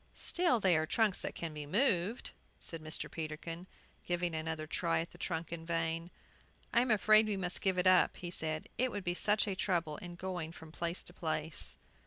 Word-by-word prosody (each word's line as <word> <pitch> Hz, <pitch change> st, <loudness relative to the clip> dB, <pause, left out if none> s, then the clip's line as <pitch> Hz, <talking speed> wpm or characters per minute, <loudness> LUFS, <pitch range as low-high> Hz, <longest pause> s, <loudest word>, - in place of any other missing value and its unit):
"Still 345 Hz, -9 st, +2 dB
they 185 Hz, -4 st, +4 dB
are 155 Hz, 0 st, 0 dB
trunks 210 Hz, +1 st, +2 dB
that -, -, -3 dB
can 165 Hz, -2 st, -4 dB
be 150 Hz, -1 st, -6 dB
moved," 205 Hz, -, +1 dB, 0.3 s
said 165 Hz, -2 st, -5 dB
Mr. 155 Hz, 0 st, -3 dB
Peterkin, 165 Hz, +2 st, -5 dB, 0.4 s
giving 175 Hz, -1 st, 0 dB
another 160 Hz, 0 st, -2 dB
try 165 Hz, +2 st, 0 dB
at 165 Hz, -, -3 dB
the 175 Hz, -, -15 dB
trunk 165 Hz, -2 st, -3 dB
in 165 Hz, -1 st, -5 dB
vain. 165 Hz, 0 st, -1 dB, 0.6 s
"I 235 Hz, -, +6 dB
am 250 Hz, -, 0 dB
afraid 215 Hz, 0 st, +6 dB
we 205 Hz, -2 st, 0 dB
must 180 Hz, -1 st, 0 dB
give 190 Hz, -2 st, +2 dB
it 180 Hz, -, +2 dB
up," 185 Hz, 0 st, +5 dB
he 175 Hz, -1 st, -5 dB
said; 155 Hz, -2 st, -1 dB
"it 255 Hz, +1 st, +3 dB
would 205 Hz, -4 st, -4 dB
be 175 Hz, -, 0 dB
such 210 Hz, +4 st, +3 dB
a 200 Hz, -, 0 dB
trouble 170 Hz, -5 st, 0 dB
in 175 Hz, -1 st, -8 dB
going 175 Hz, -3 st, -4 dB
from 160 Hz, -2 st, -11 dB
place 170 Hz, +2 st, -2 dB
to 175 Hz, -, -9 dB
place." 160 Hz, -3 st, -2 dB
175 Hz, 205 wpm, -34 LUFS, 160-190 Hz, 0.6 s, I